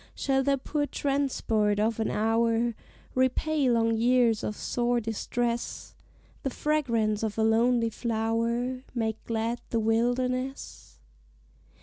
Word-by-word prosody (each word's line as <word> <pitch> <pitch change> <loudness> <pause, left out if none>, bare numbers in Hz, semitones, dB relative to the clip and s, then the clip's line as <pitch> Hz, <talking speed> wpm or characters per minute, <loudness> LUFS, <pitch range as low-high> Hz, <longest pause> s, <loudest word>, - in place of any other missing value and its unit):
Shall 270 -1 +1
the 275 +1 +2
poor 290 +2 -2
transport 255 -7 0
of 225 +1 +1
an 220 - 0
hour 230 +2 +1 0.4
Repay 260 +2 +1
long 230 -1 +2
years 235 -1 +3
of 210 - -3
sore 240 0 0
distress 235 +2 -3 0.5
The 270 - -1
fragrance 235 -8 0
of 220 -1 -2
a 220 - +2
lonely 230 +1 +3
flower 230 +3 -1
Make 220 -2 -2
glad 230 +1 -2
the 230 - 0
wilderness? 250 +4 -1
235 Hz, 115 wpm, -28 LUFS, 225-255 Hz, 0.5 s, years